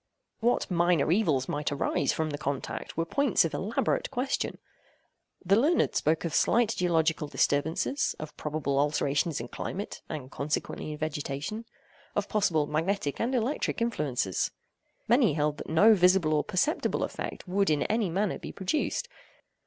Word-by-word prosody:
What 235 -3 +1
minor 175 -3 +3
evils 160 -10 +2
might 145 0 -2
arise 140 0 0
from 160 -1 -1
the 145 - -3
contact 140 +1 -4
were 165 - +1
points 275 0 +2
of 165 - -3
elaborate 215 +4 -1
question. 255 +3 -2 0.9
The 195 +3 +5
learned 295 +10 +2
spoke 160 +2 +1
of 165 - -3
slight 230 +5 +3
geological 160 -3 +1
disturbances, 160 - 0
of 150 -1 -8
probable 145 -2 -1
alterations 145 +1 +1
in 120 +1 -6
climate, 200 +2 -5
and 140 -4 -6
consequently 150 +1 -3
in - - -7
vegetation, 155 +7 -4 0.5
of - - 0
possible 170 -8 +2
magnetic 160 0 -1
and 250 +3 0
electric 250 +3 -1
influences. 145 - 0 0.6
Many - - +4
held 150 0 0
that - - -7
no 205 +8 +6
visible 180 -4 +4
or 150 - +2
perceptible 295 - 0
effect - - -5
would 195 +1 +1
in 150 -2 +2
any 215 -3 0
manner 195 +4 -1
be - - -7
produced. 290 - -1
165 Hz, 150 wpm, -28 LUFS, 150-205 Hz, 0.9 s, no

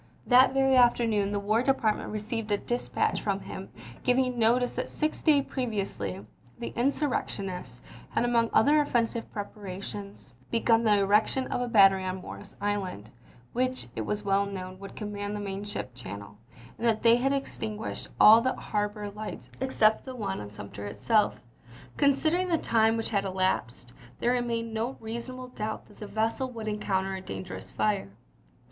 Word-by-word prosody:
That 255 +1 +6
very 270 -1 +4
afternoon 230 -5 +4
the 205 - 0
War 215 +3 +2
Department 255 -5 +1
received 215 +1 -4
a 205 - +3
dispatch 240 +4 -1
from - - -1
him - - -7 0.3
giving 250 -1 +2
notice 240 +2 +3
that - - -3
six 305 0 -2
days 290 -4 +4
previously 195 - -3 0.3
the 235 - -4
insurrectionists 240 -8 -2 0.3
had - - +1
among 235 -1 +2
other 295 +5 +5
offensive 235 -4 -1
preparations 200 - -7 0.2
begun 230 0 +3
the 210 -2 +4
erection 210 +6 +3
of - - -1
a 245 - -1
battery 195 -4 +6
on 185 0 -3
Morris 200 +2 -10
Island, 190 - -3 0.4
which 255 - -1
it - - -2
was 210 - -2
well 200 0 +2
known 185 -1 -6
would 195 0 -9
command 205 -1 -4
the - - -3
main 200 -1 -4
ship 205 -11 -5
channel, 100 -3 -9 0.4
and 235 - +1
that 220 -2 +1
they 230 0 +7
had 265 +3 +1
extinguished 220 -6 -3
all 220 +2 +9
the 260 +2 +1
harbor 210 0 -2
lights 210 +1 -7
except 220 -5 +3
the 260 -1 -6
one 200 -5 -3
on 105 - -7
Sumter 100 0 -8
itself. 210 - +1 0.6
Considering 315 +6 +3
the 340 -2 +2
time 225 -4 +3
which 225 - -2
had 200 -2 +1
elapsed, 185 -11 -1 0.3
there 240 - +2
re 250 - +2
mained 230 -1 -2
no 230 +4 -2
reasonable 245 +3 -6
doubt 215 -3 -4
that - - -19
the 210 - -6
vessel 225 +5 -1
would 225 -3 -6
encounter 195 -2 -1
a 190 - -4
dangerous 185 -1 -7
fire. 205 - 0
215 Hz, 165 wpm, -28 LUFS, 195-245 Hz, 0.6 s, all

